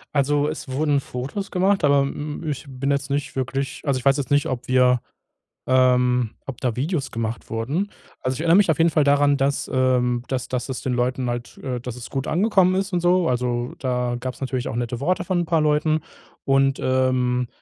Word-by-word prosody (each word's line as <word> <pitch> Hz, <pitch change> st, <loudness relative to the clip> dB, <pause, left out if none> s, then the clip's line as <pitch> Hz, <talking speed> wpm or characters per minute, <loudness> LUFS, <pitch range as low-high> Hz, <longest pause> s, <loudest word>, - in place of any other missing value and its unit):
Also, 145 Hz, +1 st, +2 dB
es 155 Hz, -2 st, -5 dB
wurden 145 Hz, +2 st, +1 dB
Fotos 140 Hz, +10 st, -5 dB
gemacht, 195 Hz, 0 st, +2 dB
aber 140 Hz, -1 st, +5 dB
m 145 Hz, +3 st, -4 dB
ich 145 Hz, 0 st, -3 dB
bin 135 Hz, +1 st, -2 dB
jetzt 140 Hz, 0 st, -1 dB
nicht 140 Hz, +1 st, -2 dB
wirklich 135 Hz, +1 st, -3 dB
also, 140 Hz, -3 st, +1 dB
ich 125 Hz, -, -12 dB
weiß 135 Hz, +1 st, +5 dB
jetzt 140 Hz, -1 st, -4 dB
nicht, 145 Hz, 0 st, +3 dB
ob 125 Hz, -1 st, -4 dB
wir, 125 Hz, -1 st, +4 dB, 0.7 s
ähm, 125 Hz, -2 st, +3 dB, 0.2 s
ob 135 Hz, -3 st, -7 dB
da 125 Hz, -4 st, -1 dB
Videos 145 Hz, +1 st, -1 dB
gemacht 115 Hz, 0 st, -4 dB
wurden. 140 Hz, -, -2 dB, 0.3 s
Also, 130 Hz, 0 st, -1 dB
ich -, -, -6 dB
erinner 165 Hz, +1 st, +4 dB
mich 195 Hz, -2 st, +5 dB
auf 160 Hz, -, +1 dB
jeden 165 Hz, +1 st, +4 dB
Fall 150 Hz, -1 st, +2 dB
daran, 145 Hz, 0 st, +4 dB
dass, 140 Hz, 0 st, 0 dB
ähm, 125 Hz, -2 st, +2 dB
dass 130 Hz, -2 st, -2 dB
dass 125 Hz, 0 st, -3 dB
es 130 Hz, -, -4 dB
den 130 Hz, -, -1 dB
Leuten 125 Hz, +1 st, 0 dB
halt 120 Hz, -1 st, -5 dB
äh, 125 Hz, -2 st, -4 dB
dass 125 Hz, 0 st, -6 dB
es 125 Hz, -, -9 dB
gut 135 Hz, +1 st, -3 dB
angekommen 185 Hz, 0 st, +3 dB
ist 195 Hz, +1 st, -1 dB
und 175 Hz, -, +1 dB
so. 175 Hz, 0 st, +3 dB
Also, 120 Hz, -1 st, -1 dB
da 125 Hz, -2 st, -1 dB
gab's 130 Hz, 0 st, -5 dB
natürlich 130 Hz, -2 st, -2 dB
auch -, -, -4 dB
nette 120 Hz, 0 st, -3 dB
Worte 175 Hz, +4 st, 0 dB
von 180 Hz, 0 st, 0 dB
'n -, -, -5 dB
paar 165 Hz, -1 st, +2 dB
Leuten. 155 Hz, +1 st, +2 dB, 0.4 s
Und, 135 Hz, 0 st, +3 dB
ähm, 130 Hz, -1 st, +1 dB
135 Hz, 210 wpm, -23 LUFS, 125-150 Hz, 0.7 s, aber